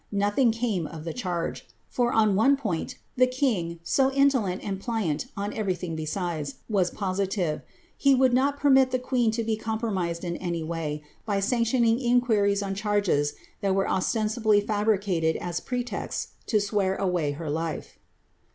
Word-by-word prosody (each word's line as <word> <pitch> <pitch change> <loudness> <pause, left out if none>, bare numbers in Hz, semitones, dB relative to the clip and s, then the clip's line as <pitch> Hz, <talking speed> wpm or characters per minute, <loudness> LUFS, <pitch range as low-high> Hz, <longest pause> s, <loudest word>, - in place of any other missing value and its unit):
* - - -40
Notliing 205 +5 +2
came 220 -8 -1
of 155 0 -8
tiie 165 - -4
charge; 180 -8 -3 0.2
for, 240 -1 0
on 215 -4 +3
one 270 +7 +4
point, 205 -12 -3 0.2
the 255 0 +5
kin^, 230 -11 0
so 265 +9 +2
indolent 265 -9 +2
and 195 -1 -4
pHant 220 -5 -1
on 205 +1 -3
ever} 200 -4 -1
thing 175 -2 -5
besides, 155 -2 -3
was 195 -5 +2
posi 195 0 -2
tive; 175 -7 -1 0.4
lie 275 -1 +6
would 260 -1 +4
not 275 +3 +2
permit 265 -2 +5
the 255 - +1
queen 250 -2 +1
to 225 +1 -1
be 220 0 0
compromised 215 -6 -2
in 170 -1 -3
any 170 -2 -3
way. 155 -2 -3 0.2
by 205 -2 0
sanctioning 230 +2 +2
inquiries 225 -5 +2
on 195 -1 -2
charges 200 -8 +1 0.3
that 195 -1 +1
were 195 - +1
ostensibly 215 +2 +2
fabricated 205 -6 +1
as 175 -1 -3
pretexts 245 +4 -3 0.2
to 215 - +3
swear 200 -2 0
away 175 -7 0
her 160 +2 -6
life. 160 +1 -4
205 Hz, 165 wpm, -26 LUFS, 175-235 Hz, 0.4 s, lie